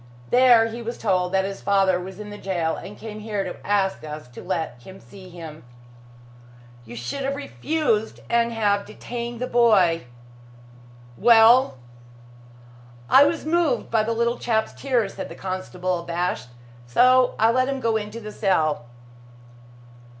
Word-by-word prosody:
There, 245 -2 +6
he 225 +1 -5
was 235 +1 -5
told 185 -4 0
that 190 0 +1
his 195 0 -6
father 195 -2 +2
was 185 +2 -9
in 210 -1 -8
jail, 170 -4 -1
and 205 - -9
came 215 -1 -8
here 210 -2 -3
to 185 - -6
ask 200 -1 0
us 150 -3 -8
to 125 - -11
let 160 -9 -3
him 190 +9 -12
see 190 -2 -14
him." 165 -3 -10 1.2
"You 120 +1 -10
should 120 - -5
have 275 +1 -1
refused 285 -5 -2
and 235 0 +1
have 205 -3 0
detained 235 +2 -6
the 250 - -2
boy. 205 - +3 1.1
Well?" 230 - +6 1.3
"I 280 - +8
was 315 +1 -1
moved 315 -6 0
by 225 -1 +3
the 225 +2 -1
little 235 +1 0
chap's 220 -2 0
tears," 240 -7 -1
said - - -7
the - - -9
constable, 185 -1 -3
abashed, 170 -6 -3 0.4
"so 255 - +4
I 225 +1 +4
let 255 +2 +1
him 275 -1 -2
go 230 -3 0
into 210 +1 -4
the 215 -2 -8
cell." 160 - 0
210 Hz, 150 wpm, -23 LUFS, 185-235 Hz, 1.3 s, I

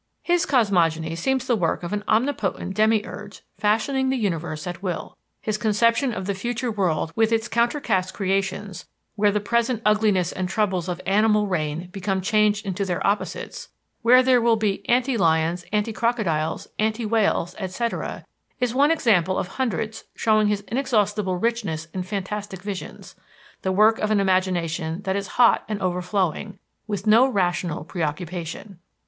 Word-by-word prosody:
His 350 -1 +1
cosmogony 165 - +2
seems 260 +9 0
the 245 - +2
work 175 -4 -1
of 175 - -4
an 210 0 -2
omnipotent 220 -5 0
demiurge 215 -2 0 0.2
fashioning 260 +6 +1
the 265 - +1
universe 170 -6 -2
at 175 -1 -6
will. 180 -4 -4 0.3
His 215 -1 -1
conception 230 +4 +2
of 190 -5 -4
the 200 - -1
future 240 +4 -3
world 170 -6 -1
with 225 0 +2
its 225 0 +1
"counter 235 +4 +1
cast" 185 -8 0
creations, 195 -1 -2 0.3
where 205 -1 +3
the 210 - 0
present 235 +3 0
ugliness 210 -4 +3
and 185 -1 -3
troubles 190 -4 0
of 175 0 -3
animal 210 +1 +3
reign 170 -2 -2
become 195 0 -2
changed 210 +2 +2
into 195 0 -2
their 180 -2 -2
opposites, 200 -2 -2 0.3
where 250 +2 +6
there 255 -1 +4
will 230 0 +4
be 205 -2 -1
"anti 250 +1 +2
lions," 165 -1 +1
"anti 210 +1 0
crocodiles," 210 -11 -1
"anti 220 +2 0
whales," 210 -5 +1
etc., 210 +5 -3 0.3
is 250 -2 0
one 280 +3 +4
example 200 - +2
of 180 - -2
hundreds 220 -3 -3
showing 215 -1 +3
his 205 -1 0
inexhaustible 210 -5 0
richness 200 -7 -1
in 185 - -2
fantastic 195 0 -5
visions: 200 -2 -7 0.5
the 190 - -1
work 215 +4 +4
of 215 - 0
an 215 -1 +3
imagination 180 -2 0
that 190 0 -1
is 200 -1 -2
hot 240 -1 +5
and 210 -1 -2
overflowing, 185 +1 -1 0.3
with 205 -3 -3
no 230 +5 +6
rational 175 - -1
preoccupation. 170 +3 -5
205 Hz, 155 wpm, -23 LUFS, 185-225 Hz, 0.5 s, where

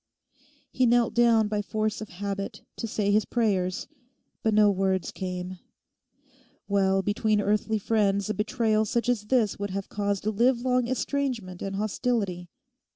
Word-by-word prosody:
He 255 - +2
knelt 240 0 +3
down 230 -2 +4
by 210 0 -1
force 215 +1 -2
of 215 - -7
habit 200 +2 -5
to 230 - -3
say 205 -1 0
his 210 +1 +4
prayers; 190 -6 0 0.5
but 220 - +1
no 210 -1 +5
words 190 -3 0
came. 180 -1 -5 1.1
Well, 195 -1 +2
between 210 +1 +1
earthly 210 +2 +1
friends 200 -2 +1
a 215 - -1
betrayal 220 -1 +1
such 235 +3 -1
as 225 -4 0
this 225 -5 +1
would 200 0 -2
have 195 +1 -4
caused 200 -1 -2
a 215 - +1
livelong 250 +2 +2
estrangement 250 -7 -2
and 195 0 -3
hostility. 200 -4 -1
210 Hz, 150 wpm, -27 LUFS, 195-230 Hz, 1.1 s, no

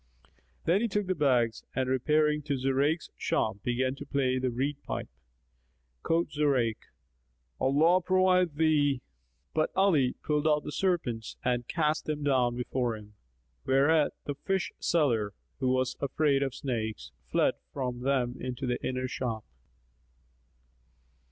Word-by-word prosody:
Then 180 +5 +3
he 235 - +2
took 210 -1 -1
the 185 - 0
bags 125 -8 +1
and 130 0 0
repairing 150 +4 +2
to 145 -2 0
Zurayk's 135 +5 0
shop - - 0
began 125 +3 0
to 145 - -7
play 130 -2 +1
the 130 0 0
reed 135 +4 -1
pipe. - - -4 0.9
Quoth 165 - 0
Zurayk, 135 -7 +1 0.8
"Allah 160 +7 +4
provide 185 -2 +3
thee!" 145 -4 +2 0.5
But 155 0 +1
Ali 165 -10 +3
pulled 150 0 +1
out 150 -1 +3
the - - -5
serpents 145 - -1
and 120 -1 0
cast 155 -2 0
them 150 -1 -3
down 125 -4 +2
before 125 -2 -1
him; 105 0 -14 0.5
whereat 145 +3 +4
the 145 - -2
fishseller, 140 - 0 0.2
who 130 - +1
was 130 0 +1
afraid 140 0 +2
of 135 -2 -1
snakes, 110 - -3 0.2
fled - - +3 0.2
from 125 -3 -3
them 125 -1 0
into 130 +1 -4
the 125 -1 -2
inner 130 0 -1
shop. 115 -4 -3
135 Hz, 135 wpm, -29 LUFS, 125-155 Hz, 0.9 s, Allah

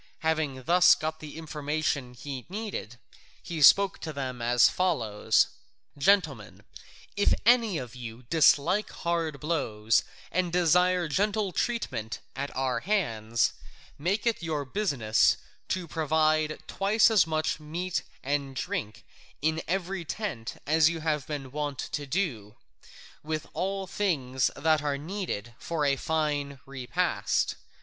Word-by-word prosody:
Having 155 -5 -1
thus 180 +3 +6
got 155 0 -4
the 155 0 -9
information 150 -4 -2
he 130 0 -7
needed, 195 - -5 0.5
he 165 -3 -4
spoke 195 +6 +6
to 160 - -5
them 130 -4 -5
as 120 0 +5
follows: 130 - +2 0.5
"Gentlemen, 145 - +1 0.5
if 205 - +3
any 230 -6 +4
of 125 -4 -6
you 120 0 -8
dislike 160 - +3
hard 165 -4 -2
blows 115 -9 +1 0.3
and 180 -1 0
desire 180 +1 +3
gentle 205 +4 0
treatment 175 - -2 0.2
at 140 +1 -3
our 130 -1 0
hands, 115 - 0 0.5
make 195 +9 0
it 230 -5 +1
your 155 -4 -2
business 130 - +2 0.3
to 185 -2 -2
provide 155 0 +1
twice 215 +3 +3
as 200 -7 +5
much 155 0 -1
meat 170 +4 -3 0.2
and 140 -1 -1
drink 110 -3 -4 0.3
in 160 +3 0
every 185 0 -2
tent 160 - -4
as 155 +2 +4
you 165 -1 -4
have 150 -3 -1
been 140 -4 -5
wont 145 -1 -3
to 145 +2 -4
do, 130 - -2 0.7
with 155 0 -3
all 195 +1 -2
things 140 -11 0
that 155 -1 +2
are 145 -1 -1
needed 150 - -4
for 160 -3 -1
a 140 -1 +3
fine 145 -2 -1
repast. 130 -2 -1
155 Hz, 130 wpm, -28 LUFS, 135-180 Hz, 0.7 s, thus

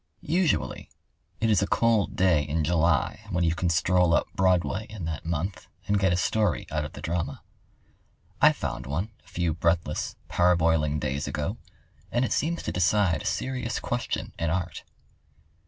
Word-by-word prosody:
] - - -44 0.2
Usually 180 -6 0 0.5
it 115 -1 +2
is 100 - +4
a 100 - +1
cold 115 -3 +2
day 90 -5 +4
in 75 +2 -1
July 85 -1 +2
when 90 -3 0
you 80 -1 +2
can 85 +1 -1
stroll 85 0 +3
up - - +2
Broadway 95 +3 +1
in 105 -6 -6
that 80 0 -5
month 85 +4 -3 0.2
and 100 0 +2
get 95 -2 +3
a 90 - +2
story 105 0 +1
out 75 -1 -1
of 75 - -7
the - - -10
drama. 85 -4 -3 1.0
I - - +8
found 65 - -4
one 85 +11 -2
a - - -28
few 85 -2 -1
breathless, 85 0 0
parboiling 80 -4 +2
days 70 +2 -2
ago, 75 +9 -3 0.5
and 120 +2 +2
it - - -1
seems 170 +3 -1
to - - -2
decide 90 -2 +2
a - - -4
serious 125 -4 -2
question 120 0 -3
in 85 - 0
art. 90 +1 -2
90 Hz, 170 wpm, -27 LUFS, 80-100 Hz, 1.0 s, I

